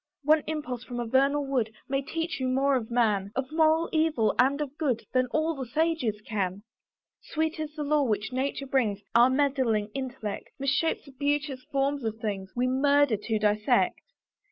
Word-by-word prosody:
One 305 +2 +4
impulse 255 -6 -4
from 245 -1 -6
a 240 - -2
vernal 275 +4 +2
wood 250 -5 0 0.2
May 275 0 0
teach 325 +2 -3
you 260 - -1
more 270 +2 +2
of 230 -4 -2
man; 210 -5 +1
Of 265 +1 -2
moral 320 +1 +3
evil 310 -10 +2
and 270 +3 +4
of 290 -2 -4
good, 260 -8 0
Than 255 0 +2
all 310 +5 0
the 265 -4 -6
sages 280 -6 0
can. 200 -2 -3 0.6
Sweet 315 +1 -2
is 305 -1 -5
the 300 - -3
lore 290 -1 +2
which 210 +1 -1
nature 275 +2 -2
brings; 230 -7 0
Our 240 +2 +6
meddling 260 -6 +1
intellect 255 -6 -5
Misshapes 275 +4 0
the 280 - -13
beauteous 285 0 -1
forms 275 -1 0
of 220 -1 -2
things; 200 -3 -3
We 245 +1 +1
murder 280 0 +3
to 220 +2 -2
dissect. 210 0 +2
265 Hz, 180 wpm, -27 LUFS, 225-290 Hz, 0.6 s, Our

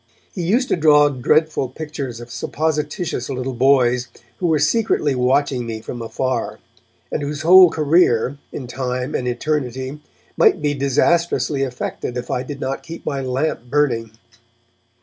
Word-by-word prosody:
He 185 - -4
used 230 +10 +1
to - - +3
draw 150 -3 +5
dreadful 145 +1 +1
pictures 140 -4 -6
of 120 0 -10
supposititious 150 -2 -2
little 130 0 -3
boys 125 -1 +3 0.3
who 180 - -1
were 160 -2 +3
secretly 150 -1 +1
watching 130 0 +1
me 110 -1 -4
from 120 +2 -7
afar, 115 -2 -2 0.5
and - - -2
whose 145 +1 -4
whole 180 +2 +8
career, 145 -5 +2
in 130 - -6
time 125 +2 -3
and 125 - -2
in 125 - +1
eternity, 130 0 -3 0.3
might - - +4
be 145 -1 0
disastrously 140 0 +1
affected 125 -1 -4
if 125 - -5
I 125 - 0
did 140 +2 -7
not 135 0 -3
keep 165 0 -10
my 140 -2 -2
lamp 130 0 -2
burning. 125 -6 +1
135 Hz, 150 wpm, -20 LUFS, 125-150 Hz, 0.5 s, whole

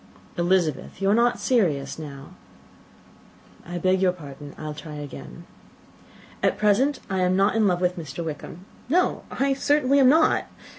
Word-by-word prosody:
"Elizabeth, 175 -5 0
you 195 0 +2
are - - +5
not 240 +2 +2
serious 165 - 0
now." 140 -3 -9 1.3
"I 175 +1 -6
beg 185 +2 +1
your 185 -1 +3
pardon. 145 -4 -11
I - - -9
will 155 -1 -4
try 150 0 -9
again. 145 -2 -9 1.0
At - - +1
present 255 +7 +2
I 190 -2 -2
am 180 0 +2
not 195 +3 +2
in 220 -2 +3
love 180 -1 +1
with 180 0 0
Mr. 160 +1 -6
Wickham; 160 +3 -7 0.2
no, 360 +5 +1
I 275 0 0
certainly 280 0 +2
am 260 -2 +6
not. 315 +3 +3
185 Hz, 160 wpm, -24 LUFS, 155-235 Hz, 1.3 s, am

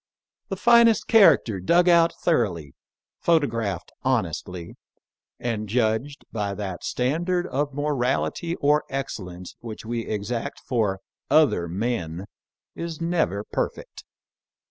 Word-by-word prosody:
The 195 - -2
finest 235 +2 +5
character 185 - +5
dug 175 - +3
out 170 -1 +5
thoroughly, 90 - 0 0.5
photographed 115 - 0
hon - - +2
estly, 90 -2 -7 0.7
and 110 -3 -3
judged 120 +5 0
by 100 -3 -2
that 95 -3 -5
standard 175 +8 0
of 145 -3 -2
morality 145 +4 -1
or 150 -1 +2
excellence 90 -10 -6
which 115 -2 -8
we 115 0 -3
exact 115 +6 -3
for 105 -6 -1 0.3
other 145 - +4
men 90 -2 -3 0.5
is 165 -2 -6
never 165 - 0
perfect. - - -4
120 Hz, 110 wpm, -24 LUFS, 100-160 Hz, 0.7 s, finest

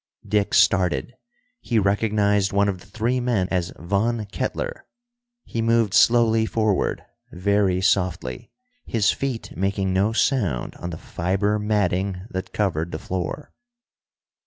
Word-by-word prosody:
Dick 105 0 +1
started; 95 +5 +3 0.5
he 120 - -1
recognized 105 0 +2
one 100 +1 +2
of 95 -2 -2
the 95 - -17
three 115 +5 -1
men 120 -7 0
as 90 -2 -1
Von 105 +6 -1
Kettler. - - -4 0.6
He 115 - -3
moved 115 -3 +2
slowly 115 -2 +4
forward, 110 -4 0 0.3
very 95 0 +1
softly, 90 -10 0 0.3
his 105 -4 +2
feet 135 -4 -4
making 95 +1 -1
no 100 +4 +2
sound 115 - 0
on 85 - -5
the 85 - -6
fiber 100 +4 -1
matting 100 -3 0
that 95 0 -5
covered 85 -5 -1
the - - -3
floor. 90 - -5
100 Hz, 130 wpm, -23 LUFS, 95-110 Hz, 0.6 s, slowly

